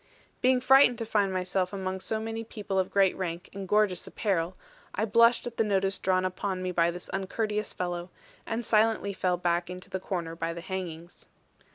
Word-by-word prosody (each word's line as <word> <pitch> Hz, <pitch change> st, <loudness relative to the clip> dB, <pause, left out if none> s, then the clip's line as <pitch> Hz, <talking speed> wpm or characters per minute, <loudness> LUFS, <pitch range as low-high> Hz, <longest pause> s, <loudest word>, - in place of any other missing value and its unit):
Being 255 Hz, 0 st, +4 dB
frightened 260 Hz, -1 st, +6 dB
to 230 Hz, -, -3 dB
find 205 Hz, -3 st, +1 dB
myself 185 Hz, 0 st, -1 dB
among 190 Hz, -1 st, -3 dB
so 220 Hz, +3 st, -2 dB
many 225 Hz, +1 st, -4 dB
people 205 Hz, -3 st, -3 dB
of 185 Hz, -, 0 dB
great 195 Hz, -2 st, +3 dB
rank 175 Hz, -2 st, -4 dB
and 195 Hz, -1 st, -6 dB
gorgeous 210 Hz, -3 st, +2 dB
apparel, 185 Hz, -4 st, -1 dB, 0.4 s
I 215 Hz, -, +1 dB
blushed 230 Hz, +3 st, +4 dB
at 240 Hz, -1 st, -6 dB
the -, -, +3 dB
notice 195 Hz, -2 st, +1 dB
drawn 185 Hz, 0 st, +1 dB
upon 185 Hz, 0 st, -2 dB
me 185 Hz, -, -1 dB
by 170 Hz, -1 st, +3 dB
this 175 Hz, +1 st, -6 dB
uncourteous 210 Hz, +2 st, -2 dB
fellow; 175 Hz, 0 st, -3 dB, 0.3 s
and 230 Hz, +1 st, -3 dB
silently 215 Hz, -2 st, +2 dB
fell 180 Hz, -2 st, 0 dB
back 175 Hz, 0 st, 0 dB
into 180 Hz, 0 st, -8 dB
the 190 Hz, -, -2 dB
corner 170 Hz, -3 st, -4 dB
by 165 Hz, 0 st, -2 dB
the 170 Hz, -, -7 dB
hangings. 175 Hz, -2 st, -6 dB
190 Hz, 190 wpm, -28 LUFS, 180-215 Hz, 0.4 s, frightened